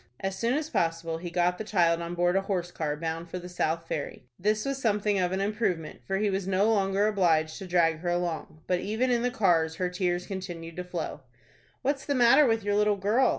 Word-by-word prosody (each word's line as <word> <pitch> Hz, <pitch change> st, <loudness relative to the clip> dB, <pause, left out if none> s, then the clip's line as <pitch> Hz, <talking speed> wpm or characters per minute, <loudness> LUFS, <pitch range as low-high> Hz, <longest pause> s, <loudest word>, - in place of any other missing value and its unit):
As 195 Hz, 0 st, -2 dB
soon 235 Hz, +5 st, 0 dB
as 305 Hz, 0 st, -2 dB
possible 165 Hz, -, -1 dB
he 175 Hz, +1 st, -5 dB
got 175 Hz, +1 st, +1 dB
the -, -, -2 dB
child 170 Hz, -5 st, +2 dB
on 170 Hz, +1 st, -4 dB
board 175 Hz, +1 st, +2 dB
a 195 Hz, -, +3 dB
horse 180 Hz, -3 st, -2 dB
car 150 Hz, -3 st, -2 dB
bound 165 Hz, +1 st, -4 dB
for 180 Hz, -, -4 dB
the 180 Hz, 0 st, -7 dB
South 165 Hz, -2 st, -2 dB
Ferry. 145 Hz, -4 st, -4 dB, 0.2 s
This 215 Hz, +3 st, +1 dB
was 275 Hz, -1 st, -2 dB
something 210 Hz, -3 st, +1 dB
of 180 Hz, -1 st, +1 dB
an 190 Hz, +1 st, -1 dB
improvement, 195 Hz, -6 st, -2 dB
for 195 Hz, -, 0 dB
he 210 Hz, +1 st, +1 dB
was 190 Hz, -1 st, -2 dB
no 195 Hz, +4 st, +3 dB
longer 195 Hz, 0 st, +2 dB
obliged 165 Hz, -6 st, +2 dB
to 190 Hz, -, -7 dB
drag 165 Hz, -3 st, +2 dB
her 175 Hz, +1 st, -2 dB
along. 175 Hz, -3 st, -2 dB
But 180 Hz, -1 st, +1 dB
even 220 Hz, +7 st, 0 dB
in 240 Hz, -1 st, +2 dB
the 250 Hz, -, +1 dB
cars 170 Hz, -9 st, +2 dB
her 180 Hz, +1 st, -1 dB
tears 180 Hz, -1 st, -1 dB
continued 175 Hz, -3 st, -6 dB
to 180 Hz, -, -3 dB
flow. 175 Hz, -4 st, -5 dB, 0.6 s
"What's 275 Hz, 0 st, 0 dB
the 285 Hz, -, +1 dB
matter 260 Hz, +4 st, +6 dB
with 225 Hz, -2 st, +1 dB
your 205 Hz, 0 st, 0 dB
little 210 Hz, 0 st, +3 dB
girl?" 220 Hz, +7 st, +3 dB
185 Hz, 230 wpm, -28 LUFS, 170-210 Hz, 0.6 s, matter